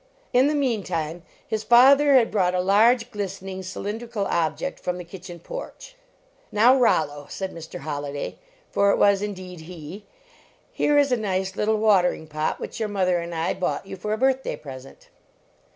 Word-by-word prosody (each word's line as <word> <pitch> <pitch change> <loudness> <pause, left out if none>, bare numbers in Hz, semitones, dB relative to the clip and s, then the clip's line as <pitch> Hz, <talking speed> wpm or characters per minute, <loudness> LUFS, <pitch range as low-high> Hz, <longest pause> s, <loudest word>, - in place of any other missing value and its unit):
In 255 +3 +5
the 300 - +1
meantime, 185 - -1 0.2
his 215 -1 -3
father 275 +5 +6
had 235 -3 +4
brought 185 -3 +1
a - - +1
large, 225 +6 +3
glistening 195 -2 -5
cylindrical 205 +3 -4
object 170 - -1
from 180 0 -3
the 180 - -6
kitchen 175 0 -10
porch. - - -9 0.6
"Now, 235 +5 +5
Rollo," 145 - +1
said 190 -1 -5
Mr. 160 -3 -9
Holliday, 145 -1 -5 0.3
for 200 - +3
it - - +3
was 200 -1 +4
indeed 185 -4 -6
he, 165 +3 -10 0.6
"here 295 - +2
is 285 -2 +3
a 250 - +3
nice 190 -3 -2
little 215 +1 +1
watering 195 -6 +3
pot 155 0 -2
which - - -7
your 220 -2 -1
mother 185 -3 +1
and 170 0 -5
I 165 +1 0
bought 185 +1 -2
you 195 - -7
for 210 +3 -5
a 215 - 0
birthday 265 +2 +1
present." 135 -2 -12
195 Hz, 170 wpm, -24 LUFS, 175-230 Hz, 0.6 s, father